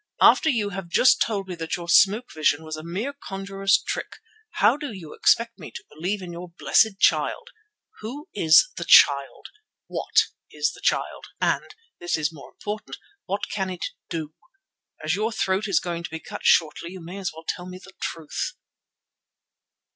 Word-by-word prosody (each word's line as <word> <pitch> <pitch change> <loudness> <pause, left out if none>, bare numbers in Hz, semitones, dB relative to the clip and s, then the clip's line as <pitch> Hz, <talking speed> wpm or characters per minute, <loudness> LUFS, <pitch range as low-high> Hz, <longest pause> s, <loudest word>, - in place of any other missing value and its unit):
"After 320 - +6
you 220 -7 0
have 195 -2 -6
just 255 - +4
told 200 -4 0
me 185 - -5
that 165 -2 -3
your 170 -1 -8
smoke 205 +7 +4
vision 155 0 +1
was 155 0 -5
a 155 - -7
mere 200 - -4
conjurer's 195 -5 0
trick, - - -4 0.4
how - - +4
do 290 -3 -6
you 180 -7 -9
expect 230 -1 +2
me 155 - -8
to - - -9
believe 185 +6 -3
in 175 - -7
your 175 +1 -8
blessed 210 -3 +3
Child? - - +2 0.5
Who 275 - -7
is 160 - +6
the - - -3
Child? 140 -1 +5 0.4
What - - +2 0.3
is 450 - -1
the - - -14
Child, - - -1
and—this 435 - -2
is 160 +1 -1
more 145 - -12
important—what 210 - -6
can 190 -2 -2
it 180 -2 -4 0.2
do? 160 -3 -4 0.7
As - - 0
your 215 +3 0
throat 195 -1 0
is 195 -5 +3
going 170 -1 -4
to 170 - -6
be 160 0 -6
cut - - -9
shortly 170 +2 +2
you 190 - -8
may 175 +4 -8
as 190 - -3
well 160 +1 -13
tell 180 0 -3
me 185 0 -8
the 190 0 -15
truth." 160 -3 -4
190 Hz, 175 wpm, -24 LUFS, 165-210 Hz, 0.7 s, After